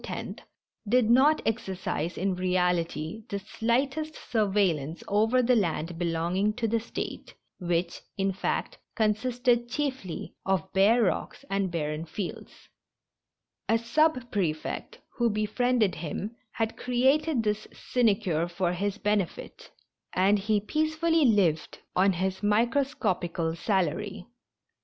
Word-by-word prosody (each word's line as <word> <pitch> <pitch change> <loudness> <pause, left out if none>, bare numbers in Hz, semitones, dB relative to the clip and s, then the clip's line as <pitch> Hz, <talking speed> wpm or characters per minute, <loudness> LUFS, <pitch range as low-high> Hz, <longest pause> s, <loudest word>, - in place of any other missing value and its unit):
— 210 - -18
did 240 -1 +4
not 285 +5 +5
exercise 190 -6 -2
in 190 +1 0
reality 180 +1 0
the 200 - -2
slightest 265 +9 -1
sur 220 -3 0
veillance 170 -6 0
over 225 +5 +3
the 250 +1 +4
land 170 -4 -1
belonging 175 +4 0
to 235 -1 -1
the 230 +1 +1
State, 225 - -6 0.2
which, 175 -1 -1 0.2
in 195 0 +1
fact, 190 - -2 0.2
consisted 240 +2 +1
chiefly 260 - -3
of 190 -4 -1
bare 210 +5 +5
rocks 215 +7 -2
and 195 -1 +1
barren 155 -2 -2
fields; 175 +3 -7 1.0
a 225 - +5
sub 250 +2 +1
prefect, 165 -7 -2 0.2
who 240 -2 +3
befriended 215 0 +1
him, 200 +7 -5 0.2
had 225 -1 -1
created 265 +2 +2
this 210 0 -1
sine 235 -5 +2
cure 170 -6 -1
for 175 0 -1
his 200 +3 -2
benefit, 210 -4 -2 0.4
and 200 +3 +3
he 210 +1 +1
peacefully 315 +6 +1
lived 185 - +2 0.2
on 195 +1 +4
his 190 +2 -2
micro 230 +6 +3
scopical 175 -10 -1
salary. 190 +1 -1
205 Hz, 125 wpm, -28 LUFS, 180-240 Hz, 1.0 s, not